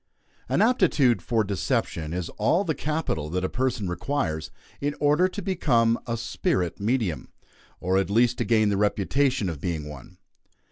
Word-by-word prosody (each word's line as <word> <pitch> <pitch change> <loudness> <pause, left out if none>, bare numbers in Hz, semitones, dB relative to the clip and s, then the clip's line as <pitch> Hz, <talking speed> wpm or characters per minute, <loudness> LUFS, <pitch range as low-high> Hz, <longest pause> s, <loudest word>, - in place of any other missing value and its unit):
An - - +3
aptitude 170 - +3
for 115 -3 +1
deception 90 -5 -2
is 90 -1 -3
all 165 - +1
the 165 -5 -1
capital 150 - -2
that 90 +3 -2
a 95 - 0
person 125 -4 -1
requires 90 - -2 0.3
in 145 +1 -2
order 150 +5 +4
to 205 +2 -6
become 120 - +2
a 115 -1 -1
"spirit 95 -6 -1
medium;" 105 -5 -1 0.5
or, 95 +1 +1
at 95 -2 -1
least, 120 +3 +2
to - - +2
gain 110 -2 +3
the 100 - +1
reputation 105 +4 +1
of 80 -5 -5
being 80 -4 -3
one. 75 -4 -11
115 Hz, 160 wpm, -25 LUFS, 90-140 Hz, 0.5 s, order